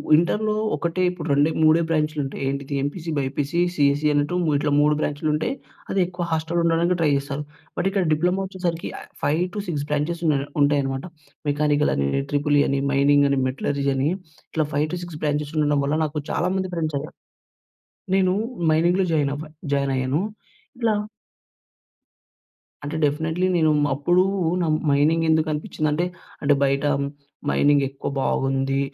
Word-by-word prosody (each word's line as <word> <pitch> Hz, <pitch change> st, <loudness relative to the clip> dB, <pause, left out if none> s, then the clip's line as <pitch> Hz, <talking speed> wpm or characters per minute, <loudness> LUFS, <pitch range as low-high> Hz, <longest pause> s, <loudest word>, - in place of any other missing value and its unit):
ఇంటర్‍లో 210 Hz, +6 st, +1 dB, 0.2 s
ఒకటే 170 Hz, +2 st, -2 dB
ఇప్పుడు 175 Hz, -3 st, -6 dB
రెండే 145 Hz, +3 st, +3 dB
మూడే 155 Hz, +2 st, +5 dB
బ్రాంచ్‌లు 155 Hz, -1 st, 0 dB
ఉంటాయి. 135 Hz, -, -6 dB
ఏంటిది 140 Hz, +1 st, -3 dB
ఎంపీసీ 165 Hz, +3 st, -4 dB
బైపీసీ 140 Hz, +4 st, -1 dB, 0.2 s
సీఈసీ 145 Hz, 0 st, +2 dB
అన్నట్టు 145 Hz, +4 st, +1 dB, 0.2 s
ఇట్లా 145 Hz, +1 st, 0 dB
3 150 Hz, +1 st, +4 dB
బ్రాంచ్‌లు 150 Hz, +1 st, -1 dB
ఉంటాయి. 150 Hz, -, 0 dB, 0.4 s
అది 195 Hz, -, 0 dB
ఎక్కువ 175 Hz, -1 st, -4 dB
హాస్టల్లో 160 Hz, +2 st, 0 dB
ఉండడానికి 170 Hz, +2 st, +2 dB
ట్రై 160 Hz, -, +3 dB
జేస్తారు. 140 Hz, +1 st, -3 dB, 0.3 s
బట్ 190 Hz, -, +1 dB
ఇక్కడ 195 Hz, -1 st, +1 dB
డిప్లొమో 180 Hz, +5 st, +1 dB
వచ్చేసరికి 180 Hz, -3 st, -3 dB
ఆహ్, -, -, -13 dB
5-6 175 Hz, 0 st, -1 dB
బ్రాంచెస్ 155 Hz, +4 st, -1 dB
ఉన్నాయి 140 Hz, -2 st, +1 dB
ఉంటాయనమాట. 140 Hz, 0 st, +1 dB, 0.4 s
మెకానికల్ 145 Hz, 0 st, +2 dB
అని, 70 Hz, 0 st, 0 dB, 0.2 s
ట్రిపుల్ 145 Hz, 0 st, +2 dB
ఈ -, -, +4 dB
అని, 140 Hz, 0 st, +1 dB
మైనింగ్ 145 Hz, +1 st, +4 dB
అని, 140 Hz, -1 st, +2 dB
మెటలర్జీ 140 Hz, +2 st, -2 dB
అని 135 Hz, +3 st, +1 dB, 0.4 s
ఇట్లా 155 Hz, -1 st, 0 dB
5-6 155 Hz, +2 st, -2 dB
బ్రాంచెస్ 150 Hz, 0 st, -1 dB
ఉండడం 145 Hz, -1 st, +2 dB
వల్ల 145 Hz, +2 st, 0 dB
నాకు 150 Hz, 0 st, -3 dB
చాలా 180 Hz, +3 st, 0 dB
మంది 190 Hz, -1 st, -2 dB
ఫ్రెండ్స్ 155 Hz, -3 st, -1 dB
అయ్యారు. 155 Hz, -, -9 dB, 1.0 s
నేను 185 Hz, -1 st, +3 dB, 0.4 s
మైనింగ్‌లో 175 Hz, +4 st, +3 dB
జాయిన్ 145 Hz, -3 st, +2 dB
అవ్వా 155 Hz, +1 st, -8 dB, 0.2 s
జాయిన్ 140 Hz, -1 st, 0 dB
అయ్యాను.ఇట్లా 215 Hz, -, -3 dB, 1.9 s
అంటే 145 Hz, +2 st, -4 dB
డెఫినెట్లీ. 160 Hz, +5 st, 0 dB
నేను 160 Hz, -2 st, +3 dB, 0.2 s
అప్పుడూ 175 Hz, +6 st, +3 dB, 0.4 s
న -, -, +1 dB, 0.3 s
మైనింగ్ 155 Hz, +4 st, +3 dB
ఎందుకనిపిచ్చిందంటే 155 Hz, +1 st, 0 dB, 0.4 s
అంటే 145 Hz, 0 st, +4 dB
బయట 140 Hz, +1 st, +1 dB, 0.7 s
మైనింగ్ 145 Hz, -1 st, +3 dB
ఎక్కువ 135 Hz, +1 st, -5 dB
బాగుంది. 135 Hz, +1 st, 0 dB
150 Hz, 140 wpm, -23 LUFS, 145-170 Hz, 1.9 s, మూడే